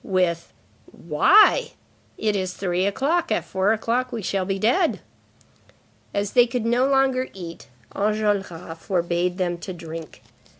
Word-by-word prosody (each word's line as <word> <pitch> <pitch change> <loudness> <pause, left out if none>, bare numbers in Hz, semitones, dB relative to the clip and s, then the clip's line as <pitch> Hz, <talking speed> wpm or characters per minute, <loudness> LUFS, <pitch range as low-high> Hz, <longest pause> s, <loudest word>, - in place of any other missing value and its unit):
with: 180 -3 0 0.4
"Why? 380 - +4 0.4
It 215 -1 0
is 185 -2 -2
three 185 0 0
o'clock; 315 - 0
at - - 0
four 200 +4 +1 0.3
we 230 -4 -5
shall 190 0 -1
be 195 +1 -2
dead." 275 - +2 1.1
As 200 0 -2
they 245 -1 +5
could 235 -1 -3
no 245 +3 +2
longer 270 -1 +2
eat, 170 -3 -9 0.3
Enjolras 200 -6 -1
forbade 175 0 -1
them 175 -2 -1
to 185 - -6
drink. 165 -2 -9
195 Hz, 130 wpm, -23 LUFS, 175-240 Hz, 1.1 s, they